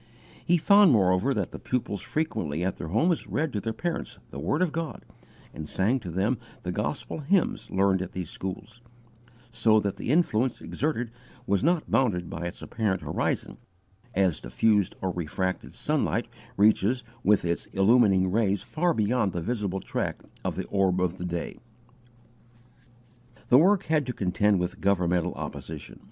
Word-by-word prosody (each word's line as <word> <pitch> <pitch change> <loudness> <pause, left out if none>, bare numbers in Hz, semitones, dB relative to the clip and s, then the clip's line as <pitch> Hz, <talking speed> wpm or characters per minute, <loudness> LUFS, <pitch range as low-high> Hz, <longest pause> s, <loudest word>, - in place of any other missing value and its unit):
He 175 - +3
found, 200 +2 +6
moreover, 95 +2 +3
that - - -1
the - - -8
pupils 115 -6 -2
frequently 85 - -2
at 95 0 -1
their - - -5
homes 160 - +1
read 155 -2 -1
to 105 - 0
their 115 +3 -3
parents 170 +9 -4
the 70 - -7
word 145 - +1
of 175 - 0
God 160 -5 -5 0.5
and 75 -1 -7
sang 110 +8 +1
to 100 -7 -7
them 100 +8 0 0.2
the - - -2
gospel - - -3
hymns 170 +5 +1
learned 95 -1 +2
at 95 - -6
these 90 -3 -4
schools, 100 +5 -6 0.7
so 115 -2 +4
that 100 -2 -2
the - - -5
influence 130 -6 +2
exerted 125 -6 -2 0.3
was 100 +2 +1
not 170 +1 +1
bounded 90 -10 +1
by 85 +1 -4
its 85 - -8
apparent 105 -5 -1
horizon, - - -2 0.6
as 95 -4 +2
diffused 100 - +1
or 95 - 0
refracted 90 +2 -3
sunlight - - 0 0.3
reaches 110 +4 +3 0.2
with 105 -3 +3
its 85 0 -1
illumining 95 -2 +4
rays 100 -2 +1
far 170 0 0
beyond 110 -2 +1
the 85 - -2
visible 100 -3 -2
track - - -3 0.2
of - - -2
the - - -3
orb 95 -2 +2
of 90 0 -1
day. 85 -1 -4 1.9
The 125 - +8
work 195 +4 +4
had 155 -4 +1
to 125 - -2
contend 100 0 +2
with 90 0 -3
governmental 90 -3 +1
opposition. - - -7
105 Hz, 160 wpm, -27 LUFS, 90-125 Hz, 1.9 s, The